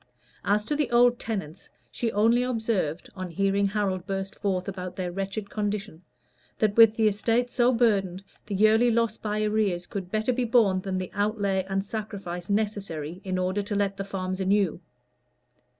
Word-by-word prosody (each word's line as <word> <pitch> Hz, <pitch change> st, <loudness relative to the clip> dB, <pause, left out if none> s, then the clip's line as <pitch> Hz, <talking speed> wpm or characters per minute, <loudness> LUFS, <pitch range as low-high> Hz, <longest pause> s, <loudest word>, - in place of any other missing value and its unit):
As 210 Hz, +1 st, +1 dB
to 295 Hz, -, -1 dB
the 295 Hz, -2 st, 0 dB
old 240 Hz, 0 st, +4 dB
tenants, 195 Hz, -9 st, -5 dB, 0.2 s
she 230 Hz, -2 st, -2 dB
only 230 Hz, +4 st, +3 dB
observed, 220 Hz, -10 st, -1 dB
on 185 Hz, -1 st, -5 dB
hearing 195 Hz, +3 st, +1 dB
Harold 195 Hz, -3 st, -2 dB
burst 195 Hz, -1 st, -3 dB
forth 190 Hz, -2 st, -2 dB
about 185 Hz, -2 st, -5 dB
their 180 Hz, -2 st, -3 dB
wretched 195 Hz, +2 st, -4 dB
condition, 205 Hz, -4 st, -3 dB, 0.6 s
"that 210 Hz, -2 st, +1 dB
with 225 Hz, -1 st, +7 dB
the 220 Hz, -1 st, +3 dB
estate 230 Hz, +4 st, +1 dB
so 245 Hz, 0 st, +3 dB
burdened, 200 Hz, -6 st, +1 dB, 0.2 s
the 205 Hz, -, -3 dB
yearly 220 Hz, +4 st, +5 dB
loss 230 Hz, -1 st, +1 dB
by 215 Hz, 0 st, -1 dB
arrears 210 Hz, -5 st, 0 dB
could 190 Hz, -3 st, -6 dB
better 220 Hz, +5 st, 0 dB
be 250 Hz, +1 st, 0 dB
borne 220 Hz, -6 st, +3 dB
than 190 Hz, 0 st, -3 dB
the 185 Hz, -1 st, -4 dB
outlay 200 Hz, -2 st, 0 dB
and 195 Hz, 0 st, -1 dB
sacrifice 200 Hz, -5 st, -5 dB
necessary 195 Hz, -6 st, -2 dB
in 185 Hz, -2 st, -2 dB
order 185 Hz, +2 st, 0 dB
to 205 Hz, +1 st, -4 dB
let 200 Hz, -1 st, 0 dB
the 195 Hz, -, -4 dB
farms 185 Hz, -1 st, -4 dB
anew." 190 Hz, -2 st, +1 dB
200 Hz, 170 wpm, -26 LUFS, 190-220 Hz, 0.6 s, with